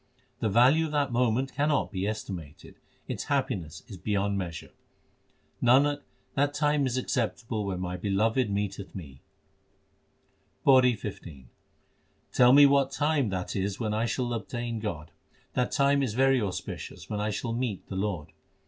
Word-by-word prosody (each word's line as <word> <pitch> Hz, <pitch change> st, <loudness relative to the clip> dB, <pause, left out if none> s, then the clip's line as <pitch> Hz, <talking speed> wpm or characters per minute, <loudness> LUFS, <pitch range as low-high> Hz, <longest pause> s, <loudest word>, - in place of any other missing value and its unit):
The 110 Hz, -, 0 dB
value 130 Hz, +9 st, +5 dB
of -, -, -7 dB
that 145 Hz, -3 st, +1 dB
moment 125 Hz, +2 st, +1 dB
cannot 145 Hz, -3 st, +1 dB
be 95 Hz, 0 st, -2 dB
estimated; 90 Hz, -8 st, -6 dB, 0.3 s
its -, -, -4 dB
happiness 105 Hz, -, -2 dB
is 100 Hz, -, -9 dB
beyond 100 Hz, +2 st, 0 dB
measure. 85 Hz, -4 st, -5 dB, 0.9 s
Nanak, 145 Hz, +4 st, +4 dB, 0.3 s
that 145 Hz, +1 st, +1 dB
time 150 Hz, -2 st, +2 dB
is 130 Hz, 0 st, -1 dB
acceptable 115 Hz, -3 st, -2 dB
when 95 Hz, -2 st, -3 dB
my 90 Hz, 0 st, -3 dB
Beloved 110 Hz, +5 st, +1 dB
meeteth 100 Hz, -1 st, -3 dB
me. 70 Hz, -8 st, -9 dB, 1.4 s
PAURI 130 Hz, -3 st, +6 dB
XV 85 Hz, -10 st, -8 dB, 0.9 s
Tell 125 Hz, 0 st, +6 dB
me 145 Hz, +2 st, +9 dB
what 140 Hz, -1 st, +4 dB
time 145 Hz, -4 st, +1 dB
that 95 Hz, -1 st, -3 dB
is 95 Hz, 0 st, -2 dB
when 110 Hz, -3 st, -1 dB
I 110 Hz, +2 st, 0 dB
shall 120 Hz, +1 st, -1 dB
obtain 120 Hz, 0 st, -4 dB
God: 85 Hz, -8 st, -5 dB, 0.4 s
That 125 Hz, -1 st, 0 dB
time 140 Hz, 0 st, +3 dB
is 120 Hz, -6 st, -1 dB
very 135 Hz, 0 st, +4 dB
auspicious 95 Hz, -4 st, -5 dB
when 105 Hz, -, -3 dB
I 105 Hz, -, 0 dB
shall 115 Hz, +3 st, -3 dB
meet 115 Hz, -5 st, -3 dB
the 95 Hz, -, -6 dB
Lord. 95 Hz, -6 st, -2 dB
115 Hz, 150 wpm, -28 LUFS, 100-135 Hz, 1.4 s, me